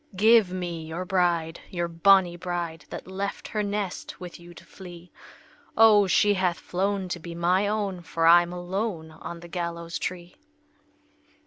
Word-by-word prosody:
"Give 215 Hz, -1 st, +5 dB
me 175 Hz, -3 st, -4 dB
your 170 Hz, +3 st, -5 dB
bride, 175 Hz, -3 st, 0 dB
your 175 Hz, -2 st, -2 dB
bonnie 175 Hz, +1 st, +4 dB
bride, 175 Hz, -3 st, -4 dB
That -, -, -7 dB
left 195 Hz, +2 st, -5 dB
her 215 Hz, -, -1 dB
nest 205 Hz, -2 st, -4 dB
with 180 Hz, -1 st, -9 dB
you 170 Hz, 0 st, -13 dB
to -, -, -14 dB
flee! 175 Hz, -2 st, -12 dB, 0.7 s
O, 215 Hz, -3 st, +6 dB
she 205 Hz, +2 st, +4 dB
hath 185 Hz, -3 st, 0 dB
flown 195 Hz, +1 st, -2 dB
to 175 Hz, -, -3 dB
be 170 Hz, 0 st, -8 dB
my 180 Hz, +4 st, +2 dB
own, 200 Hz, -4 st, -2 dB
For 165 Hz, -1 st, -2 dB
I'm 175 Hz, +1 st, +6 dB
alone 180 Hz, -2 st, -4 dB
on 170 Hz, +2 st, -9 dB
the 175 Hz, -, -10 dB
gallows 170 Hz, -1 st, -4 dB
tree!" 175 Hz, -1 st, -5 dB
180 Hz, 155 wpm, -26 LUFS, 170-195 Hz, 0.7 s, O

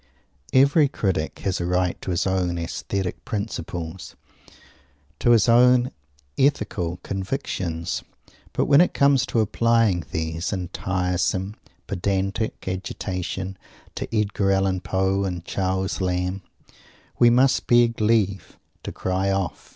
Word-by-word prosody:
Every 140 Hz, +3 st, +5 dB
critic 95 Hz, -, -2 dB
has 95 Hz, -2 st, -1 dB
a -, -, -1 dB
right 90 Hz, 0 st, +1 dB
to -, -, -6 dB
his 90 Hz, -2 st, 0 dB
own 90 Hz, -2 st, 0 dB
Aesthetic 90 Hz, +2 st, -3 dB
Principles, 90 Hz, -5 st, -5 dB, 1.0 s
to -, -, +2 dB
his 115 Hz, -2 st, +5 dB
own 125 Hz, +1 st, +5 dB, 0.5 s
Ethical 95 Hz, -, +1 dB
Convictions; 95 Hz, -, -3 dB, 0.5 s
but -, -, 0 dB
when 145 Hz, +2 st, +6 dB
it 180 Hz, -, +2 dB
comes 140 Hz, -2 st, +4 dB
to 115 Hz, -, +1 dB
applying 110 Hz, -4 st, +2 dB
these, 80 Hz, +3 st, -3 dB
in 90 Hz, -4 st, -3 dB
tiresome, 95 Hz, +1 st, -1 dB, 0.3 s
pedantic 100 Hz, +4 st, -2 dB
agitation, 95 Hz, 0 st, -4 dB, 0.3 s
to -, -, -4 dB
Edgar 105 Hz, -3 st, +1 dB
Allen 95 Hz, -1 st, +1 dB
Poe 95 Hz, +2 st, 0 dB
and 90 Hz, -3 st, -4 dB
Charles 95 Hz, 0 st, -1 dB
Lamb, 90 Hz, +1 st, -1 dB, 0.8 s
we 120 Hz, -, +7 dB
must 130 Hz, +3 st, +3 dB
beg 120 Hz, -2 st, +4 dB
leave 105 Hz, -3 st, +1 dB, 0.2 s
to -, -, -6 dB
cry 95 Hz, +1 st, -1 dB
off! 95 Hz, -2 st, -2 dB
95 Hz, 120 wpm, -23 LUFS, 90-115 Hz, 1.0 s, we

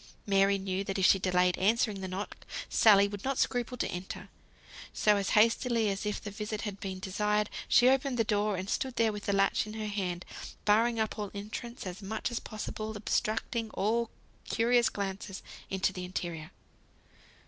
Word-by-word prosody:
Mary 195 Hz, 0 st, +4 dB
knew 190 Hz, 0 st, -2 dB
that 195 Hz, 0 st, -3 dB
if 190 Hz, -, +3 dB
she 195 Hz, -, +6 dB
delayed 180 Hz, -1 st, +2 dB
answering 210 Hz, 0 st, +2 dB
the 190 Hz, -, -3 dB
knock, 190 Hz, +3 st, -5 dB, 0.3 s
Sally 200 Hz, -2 st, +6 dB
would 205 Hz, 0 st, -7 dB
not 270 Hz, -1 st, -1 dB
scruple 245 Hz, 0 st, 0 dB
to -, -, 0 dB
enter; 180 Hz, +1 st, -6 dB, 0.6 s
so 210 Hz, -1 st, +3 dB
as 200 Hz, -1 st, -1 dB
hastily 230 Hz, 0 st, +3 dB
as 195 Hz, +2 st, -3 dB
if 210 Hz, -, -1 dB
the 205 Hz, -, -7 dB
visit 210 Hz, 0 st, -4 dB
had 205 Hz, -3 st, -5 dB
been 190 Hz, -1 st, -4 dB
desired, 210 Hz, +3 st, 0 dB, 0.2 s
she 250 Hz, -2 st, +6 dB
opened 265 Hz, 0 st, +2 dB
the 225 Hz, -, +3 dB
door, 210 Hz, -2 st, +1 dB
and 185 Hz, +1 st, -4 dB
stood 260 Hz, +4 st, -2 dB
there 230 Hz, -1 st, +3 dB
with 205 Hz, 0 st, -7 dB
the -, -, +2 dB
latch 195 Hz, +1 st, +2 dB
in 215 Hz, -, -7 dB
her 220 Hz, -1 st, -4 dB
hand, 185 Hz, -4 st, -3 dB, 0.4 s
barring 225 Hz, +3 st, +3 dB
up 220 Hz, 0 st, -1 dB
all 205 Hz, -1 st, -3 dB
entrance, 220 Hz, +4 st, -6 dB
and 185 Hz, -, -3 dB
as 190 Hz, -, -13 dB
much 220 Hz, +4 st, -3 dB
as 235 Hz, -, -2 dB
possible 215 Hz, 0 st, -5 dB
obstructing 220 Hz, +2 st, -1 dB
all 230 Hz, +3 st, +1 dB, 0.4 s
curious 235 Hz, +1 st, +3 dB
glances 195 Hz, -1 st, -5 dB, 0.3 s
into 190 Hz, 0 st, 0 dB
the 180 Hz, -, -5 dB
interior. 170 Hz, -3 st, -4 dB
210 Hz, 185 wpm, -30 LUFS, 195-225 Hz, 0.6 s, she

